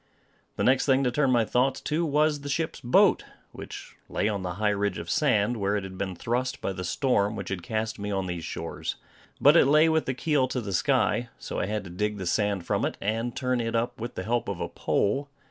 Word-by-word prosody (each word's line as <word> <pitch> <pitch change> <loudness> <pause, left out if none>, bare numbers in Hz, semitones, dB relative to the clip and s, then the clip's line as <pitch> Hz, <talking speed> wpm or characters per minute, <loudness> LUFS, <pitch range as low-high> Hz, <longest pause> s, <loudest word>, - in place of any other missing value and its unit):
The - - -1
next 130 +2 +3
thing 135 0 +4
to 125 - +1
turn 140 +2 +2
my 120 -3 +3
thoughts 130 +4 +1
to 160 +3 -1
was 150 -1 +2
the 145 - -6
ship's 160 +3 -2
boat, 125 -1 +4 0.3
which - - -9
lay 105 - 0
on 100 -2 -1
the 90 -1 -3
high 105 +1 +1
ridge 100 -1 -1
of 85 0 -5
sand, 120 -5 +2
where 100 0 0
it 100 - -1
had 95 -1 -8
been 95 -1 -3
thrust 125 +6 -2
by 95 - -2
the 90 - -5
storm 105 -2 +1
which - - -5
had 95 -2 -3
cast 110 +3 -3
me 100 0 -4
on 95 -2 -1
these 90 -2 -4
shores. - - -4 0.4
But 145 +3 +6
it 165 - +6
lay 155 +3 +5
with 160 0 +1
the 130 - -1
keel 145 -2 +1
to 130 - -2
the 100 -5 -4
sky, 120 +1 +1
so - - -5
I - - -1
had 105 0 -2
to 90 - -9
dig 105 +3 -2
the 95 - -5
sand 100 0 0
from - - 0
it, - - -1
and 115 +4 -2
turn 125 -2 0
it 115 0 -2
up 120 +1 -1
with 120 +1 -5
the 95 - -4
help 120 +4 -1
of 100 -3 -3
a - - -3
pole. 140 +8 0
115 Hz, 245 wpm, -27 LUFS, 100-130 Hz, 0.4 s, But